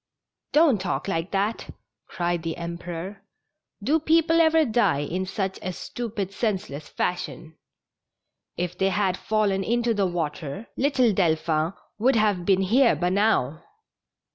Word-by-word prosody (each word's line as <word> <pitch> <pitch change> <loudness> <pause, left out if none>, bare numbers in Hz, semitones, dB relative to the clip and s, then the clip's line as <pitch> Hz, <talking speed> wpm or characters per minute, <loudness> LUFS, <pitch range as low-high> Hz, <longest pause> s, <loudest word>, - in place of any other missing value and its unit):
'' - - -63
Don't 295 - +4
talk 185 - -2
like 165 -1 -1
that! 205 +3 -1 0.2
" - - -59
cried 175 -1 -1
the 165 0 -4
Emperor. 170 +3 -6 0.3
'' - - -24
Do 310 +3 +2
peo 325 +2 +3
ple 330 +1 +3
ever 320 -1 +4
die 225 - +2
in 180 +6 -3
such 195 0 -3
a 185 - -3
stupid, 205 -1 -5
senseless 185 - -3
fasliion? 175 -2 -3 1.0
If 180 0 -2
they 190 +1 +1
had 195 -2 +1
fallen 200 -1 0
into 235 +2 +1
the 200 -3 +1
water, 160 +1 -4
little 260 -5 +2
Delphin 160 -2 +1 0.3
would 255 +4 +3
have 205 -5 +2
been 195 -1 +4
here 235 +6 +4
by 180 - 0
now." 180 - +1
195 Hz, 150 wpm, -25 LUFS, 175-225 Hz, 1.0 s, Don't